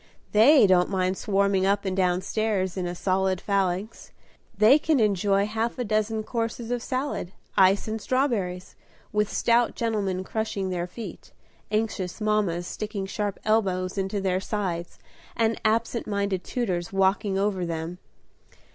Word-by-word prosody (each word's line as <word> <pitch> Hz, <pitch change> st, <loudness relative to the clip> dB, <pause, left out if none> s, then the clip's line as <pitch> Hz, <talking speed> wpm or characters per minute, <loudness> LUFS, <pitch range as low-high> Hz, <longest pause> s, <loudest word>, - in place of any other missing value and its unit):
They 245 Hz, +5 st, +7 dB
don't 185 Hz, -2 st, +4 dB
mind 185 Hz, -1 st, 0 dB
swarming 200 Hz, -1 st, +1 dB
up 200 Hz, +1 st, +1 dB
and 190 Hz, -1 st, -1 dB
down 180 Hz, -1 st, +1 dB
stairs 200 Hz, -4 st, -1 dB
in 185 Hz, -2 st, -2 dB
a 175 Hz, -, -4 dB
solid 190 Hz, 0 st, 0 dB
phalanx; 195 Hz, +2 st, -2 dB, 0.5 s
they 220 Hz, +8 st, +6 dB
can 300 Hz, -2 st, +2 dB
enjoy 200 Hz, -1 st, +2 dB
half 225 Hz, +3 st, -2 dB
a 250 Hz, -, -1 dB
dozen 215 Hz, 0 st, 0 dB
courses 230 Hz, +1 st, -3 dB
of 245 Hz, -1 st, -1 dB
salad, 255 Hz, -8 st, -3 dB, 0.2 s
ice 195 Hz, +2 st, +4 dB
and 220 Hz, 0 st, -3 dB
strawberries, 205 Hz, -10 st, -1 dB, 0.4 s
with 210 Hz, 0 st, 0 dB
stout 235 Hz, 0 st, +2 dB
gentlemen 200 Hz, -5 st, -1 dB
crushing 200 Hz, -2 st, -3 dB
their 175 Hz, -1 st, -2 dB
feet, 220 Hz, +5 st, -9 dB, 0.4 s
anxious 210 Hz, -4 st, -2 dB
mammas 210 Hz, -5 st, 0 dB
sticking 205 Hz, 0 st, -4 dB
sharp 200 Hz, 0 st, -3 dB
elbows 190 Hz, -4 st, +1 dB
into 195 Hz, +1 st, -1 dB
their 185 Hz, -1 st, 0 dB
sides, 185 Hz, -4 st, -3 dB, 0.4 s
and 225 Hz, -1 st, +1 dB
absent 230 Hz, +2 st, 0 dB
minded 200 Hz, -3 st, -1 dB
tutors 180 Hz, -8 st, -2 dB
walking 195 Hz, +1 st, +1 dB
over 195 Hz, -2 st, 0 dB
them. 170 Hz, +1 st, -4 dB
200 Hz, 145 wpm, -26 LUFS, 185-220 Hz, 0.5 s, They